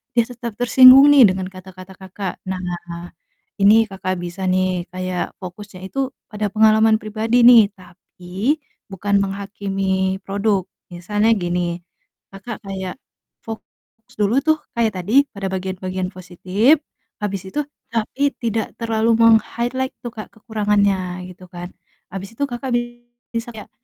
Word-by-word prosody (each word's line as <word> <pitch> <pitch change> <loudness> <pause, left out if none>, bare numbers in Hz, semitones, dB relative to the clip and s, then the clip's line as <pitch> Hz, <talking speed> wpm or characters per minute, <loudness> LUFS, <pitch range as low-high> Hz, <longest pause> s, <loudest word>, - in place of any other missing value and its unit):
dia 235 - +5
tetap 235 -2 -6
tersinggung 255 +3 +8
nih." 280 -3 +8
Dengan 185 0 -3
kata-kata 185 0 -12
Kakak, 190 0 -5
nah, 175 -2 -6 0.5
ini 215 +3 +6
Kakak 190 -1 -3
bisa 175 +2 -7
nih, 185 -1 0
kayak 185 0 -4
fokusnya 190 +1 -9
itu 275 - -5 0.3
pada 210 0 -2
pengalaman 220 0 +5
pribadi 220 +3 +1
nih, 235 -3 +8
tapi 185 - -4 0.4
bukan 200 +2 -1
menghakimi 195 -1 -2
produk. 200 0 0 0.3
Misalnya 205 +5 0
gini, 175 -1 -2 0.6
Kakak 200 +2 -8
kayak 190 -1 -5 0.5
fokus 225 0 -12
dulu 210 +3 +2
tuh, 315 +1 +2 0.2
kayak 230 -2 +1
tadi, 185 +5 -4 0.2
pada 200 -1 -6
bagian-bagian 185 0 -3
positif, 185 - +1 0.4
habis 195 -3 -2
itu 295 - -1 0.3
tapi 270 +5 0
tidak 225 -2 -2
terlalu 225 -1 0
meng-highlight 235 +3 +2
tuh, 240 - -4
Kak, 215 -2 -8
kekurangannya, 200 -5 0
gitu 185 0 -13
kan, 175 0 -7 0.4
habis 195 +1 -6
itu 230 - -11
Kakak 250 +2 -5 0.6
bisa 230 +1 -3
kayak, 210 - -10
200 Hz, 130 wpm, -20 LUFS, 185-225 Hz, 0.6 s, tersinggung